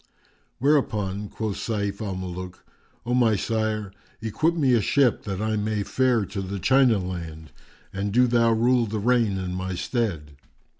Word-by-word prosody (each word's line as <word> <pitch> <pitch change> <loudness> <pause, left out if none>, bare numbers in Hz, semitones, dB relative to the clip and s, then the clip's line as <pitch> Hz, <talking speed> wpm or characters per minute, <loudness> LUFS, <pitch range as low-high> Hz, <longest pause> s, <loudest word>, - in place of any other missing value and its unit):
Whereupon 105 -8 0
quoth 110 -3 -4
Sayf 100 -3 -3
al 100 -3 -3
Muluk, 90 0 -7 0.4
"O 120 - -1
my 120 -3 +4
sire, 110 -1 -2 0.3
equip 135 +10 0
me 140 -6 +2
a 115 - +4
ship, 130 +3 +2
that 95 -3 -3
I 110 +1 0
may 105 0 -1
fare 125 -2 +1
to 100 +1 -5
the 95 +1 -4
China 125 +3 +4
land; 85 -5 -6 0.4
and 100 +1 -2
do 125 +4 +4
thou 120 -1 +3
rule 120 +1 +3
the 110 +1 -3
reign 115 -2 +2
in 90 -1 -4
my 95 0 -3
stead." 85 - -3
105 Hz, 160 wpm, -25 LUFS, 95-120 Hz, 0.4 s, my